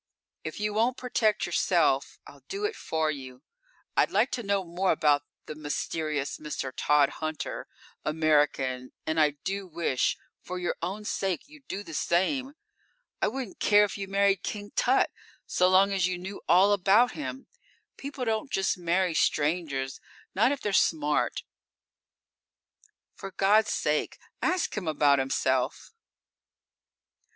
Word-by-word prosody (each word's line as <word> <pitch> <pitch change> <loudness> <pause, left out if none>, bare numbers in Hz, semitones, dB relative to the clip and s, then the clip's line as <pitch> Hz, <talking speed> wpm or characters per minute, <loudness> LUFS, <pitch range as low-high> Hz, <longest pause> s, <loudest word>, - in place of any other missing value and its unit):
If - - -6
you 210 0 -1
won't 235 +4 +1
protect 225 -4 +1
yourself, - - +1
I'll - - -14
do 400 +1 -3
it 420 +1 -2
for 160 -1 -1
you. 130 -2 -9 0.5
I'd - - +3
like 220 +7 +2
to 245 - -2
know 200 -2 0
more 180 +2 0
about 150 -3 +3 0.2
the - - -6
mysterious 150 -1 -3
Mr. 150 -3 -4
Tod 145 -1 +3
Hunter, 155 0 -4 0.4
American, 145 -5 +1
and 160 +1 0
I 150 -2 +3
do 195 0 -3
wish, 165 -6 0 0.2
for 180 - -6
your 180 -1 -2
own 195 +5 -4
sake, 195 0 -2
you'd 295 -2 -17
do 200 +2 -4
the 165 - -10
same. 260 - 0 0.7
I - - +3
wouldn't 250 -2 -5
care 205 0 +5
if 205 - -2
you 195 -1 -5
married 195 0 +2
King 205 -1 -5
Tut, 255 +2 +3 0.3
so 180 - +2
long 195 +2 +5
as 185 -2 +2
you 185 -1 -2
knew 190 +3 -7
all 190 +4 +6
about 205 +5 +4
him. 270 -3 -6 0.5
People 275 -2 -5 0.2
just 195 -7 0
don't 175 - -14
marry 180 +1 +2
strangers; 145 -4 0 0.3
not 225 +7 +3
if 285 - -3
they're 205 - -2
smart. 150 -5 +1 1.7
For 195 - -8
God's 205 +3 +3
sake, 150 0 0 0.2
ask 365 -1 0
him 200 -6 -4
about 145 -2 +3
himself!" 130 - -1
185 Hz, 145 wpm, -28 LUFS, 155-210 Hz, 1.7 s, all